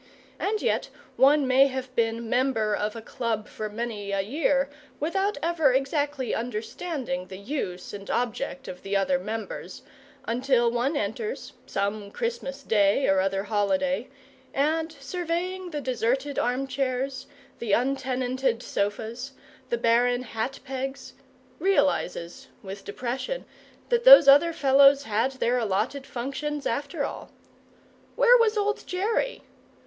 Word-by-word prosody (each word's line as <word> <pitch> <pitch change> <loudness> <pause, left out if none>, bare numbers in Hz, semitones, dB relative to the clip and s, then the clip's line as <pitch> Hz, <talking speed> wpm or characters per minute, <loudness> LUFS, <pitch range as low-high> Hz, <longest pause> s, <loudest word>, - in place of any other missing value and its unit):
And 425 +2 -1
yet - - 0 0.3
one 285 +1 +5
may 265 +2 +6
have 260 -1 -5
been 230 0 0
member 225 -4 +1
of 210 +1 -2
a 225 - -7
Club 225 -3 -3
for 215 0 -5
many 210 -2 -4
a 195 0 +1
year 275 +5 +1 0.3
without 385 +7 0
ever 320 -5 +3
exactly 275 0 0
understanding 230 - -4
the 190 - -8
use 200 -5 -4
and 200 -1 -8
object 265 +3 -2
of 180 - -8
the 195 0 0
other 185 -2 +1
members, 215 +3 -6 0.4
until 240 0 +2
one 255 +5 0
enters, 285 - -4
some 200 +1 -2
Christmas 285 - -4
day 210 +3 +3
or 195 0 +4
other 195 +1 0
holiday, 210 +5 0 0.5
and, 315 +3 +1
surveying 355 +5 -3
the 300 -3 -4
deserted 260 +2 -1
armchairs, 265 +1 -1 0.3
the 230 -3 -3
untenanted 255 -1 0
sofas, 225 +6 -3 0.4
the 235 - 0
barren 245 +2 +2
hat 235 +3 -4
pegs, 270 +1 -5 0.5
realizes, 280 - 0 0.2
with 195 0 -8
depression, 255 - -4 0.4
that 475 -1 +2
those - - +10
other 290 +5 +7
fellows 275 -1 +5
had 225 +3 0
their 250 -1 +1
allotted 230 +6 -1
functions, 275 +4 -4
after 285 +1 -1
all. - - -7 0.9
Where - - +6
was 450 -1 +3
old 420 0 -1
Jerry? 445 +7 -1
260 Hz, 130 wpm, -26 LUFS, 220-285 Hz, 0.9 s, those